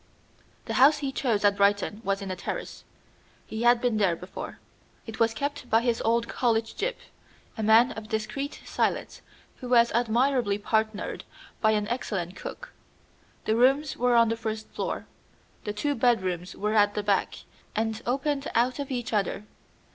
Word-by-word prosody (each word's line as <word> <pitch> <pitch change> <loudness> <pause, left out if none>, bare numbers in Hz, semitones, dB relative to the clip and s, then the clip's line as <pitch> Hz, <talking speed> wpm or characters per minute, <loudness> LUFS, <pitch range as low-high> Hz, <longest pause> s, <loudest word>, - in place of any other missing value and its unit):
The - - -3
house 295 +3 +7
he 280 -2 -3
chose 230 -6 0
at 200 0 +4
Brighton 205 +1 +2
was 195 -1 -1
in 190 - -4
a - - -3
terrace. 180 - -6 0.6
He 220 - -5
had 240 0 +5
been 240 -3 +1
there 190 -5 +2
before. 180 +3 -8 0.5
It 225 0 -8
was 225 -1 +2
kept 285 0 -4
by 225 +1 +4
his 235 -1 0
old 230 +1 +1
college 225 -2 0
gyp, - - -1 0.6
a - - -4
man 220 +3 +5
of 220 -1 -8
discreet 275 +7 -3
silence, - - -1 0.4
who 250 - -8
was 235 -1 +5
admirably 240 -1 +2
partnered 220 0 -1 0.4
by 220 -1 +4
an 210 -1 0
excellent 195 -7 -3
cook. - - -8 0.7
The 220 - +2
rooms 270 +5 +3
were 245 0 +2
on 230 -1 +5
the 225 - 0
first 220 -1 -4
floor. - - -4 0.6
The 210 - -2
two 285 +8 -1
bedrooms 185 -8 0
were 210 +1 -1
at 205 -1 +4
the 210 - -1
back, 200 -1 +1 0.4
and 220 0 -1
opened 275 +2 -1
out 245 +3 +2
of 280 - -4
each 245 -3 -3
other. 205 0 -1
225 Hz, 170 wpm, -27 LUFS, 210-250 Hz, 0.7 s, house